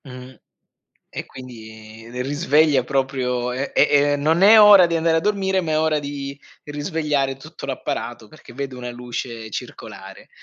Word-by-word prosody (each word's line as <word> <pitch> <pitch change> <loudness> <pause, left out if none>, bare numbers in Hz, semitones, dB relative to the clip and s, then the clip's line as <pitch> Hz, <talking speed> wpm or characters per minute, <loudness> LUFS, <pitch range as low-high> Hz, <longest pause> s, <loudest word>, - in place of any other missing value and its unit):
Mhmm. 130 -1 -11 0.8
E - - -6
quindi 110 -3 -12
risveglia 145 -1 +2
proprio 130 -2 -2
eh, 130 +3 -4
è 145 0 +3
non 155 +4 +1
è 215 +2 +8
ora 205 -3 +8
di 170 - -2
andare 165 0 +2
a - - +2
dormire, 190 0 0
ma 165 -4 -3
è 155 - +1
ora 155 -1 +1
di 140 -1 -7 0.2
risvegliare 150 -2 -2
tutto 135 - -11
l'apparato, - - -5
perché - - -16
vedo 135 0 -6
una 125 -1 -6
luce 120 -2 -7
circolare. - - -9
140 Hz, 150 wpm, -21 LUFS, 125-160 Hz, 0.8 s, è